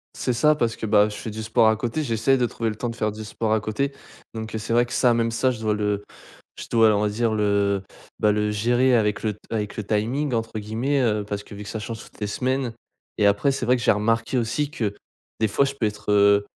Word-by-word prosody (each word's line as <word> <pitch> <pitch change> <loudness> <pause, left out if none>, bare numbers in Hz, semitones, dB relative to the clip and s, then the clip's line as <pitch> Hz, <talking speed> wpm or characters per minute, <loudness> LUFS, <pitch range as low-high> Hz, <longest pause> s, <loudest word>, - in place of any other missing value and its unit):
C'est 125 - -1
ça 150 +6 +4
parce 120 -5 0
que, - - -5
bah, 105 0 +4
je 105 - -7
fais 110 - -6
du 110 +1 -6
sport 110 0 +3
à 110 - +3
côté, 120 +7 -2
j'essaye 115 +2 +2
de 125 - +2
trouver 115 -1 -2
le 105 - -4
temps 120 +2 -3
de 115 - -6
faire 105 0 -1
du 110 +1 -8
sport 110 +1 -2
à 110 - +3
côté 110 +7 -2 0.4
donc, 110 0 -6
heu, - - 0
c'est 110 +1 -3
vrai 120 +1 +4
que 120 - -8
ça, 125 -2 +4
même 115 0 +1
ça, 130 +3 +1
je 115 - -6
dois 110 -1 0
le 105 -1 -1 0.5
je - - -7
dois 115 -1 +5
on 100 - +1
va 105 - +2
dire 110 +2 0
le, 100 -2 +1 0.4
bah 105 -1 +3
le 105 0 0
gérer 120 +4 +3
avec 105 -2 0
le 105 -2 -1
t - - -22
avec 105 -2 -3
le 110 - -4
timing 125 +7 0
entre 115 -1 -2
guillemets, 120 +7 -1
heu, 105 -4 +1
parce 100 0 -5
que - - -11
vu 105 - -8
que 100 - -9
ça 110 - -4
change 110 +1 -6
toutes - - -16
les 105 - -1
semaines 130 +2 -1 0.4
et 105 - +3
après 100 +8 +3
c'est 135 - -3
vrai 125 +1 +3
que 120 - -5
j'ai - - +5
remarqué 115 +4 0
aussi 125 +6 -1
que, 105 -8 -2 0.5
des 110 - +3
fois 140 - +2
je 140 0 -2
peux 120 -6 -1
être, 105 0 -4
heu, 100 0 +5
110 Hz, 270 wpm, -24 LUFS, 105-120 Hz, 0.5 s, dois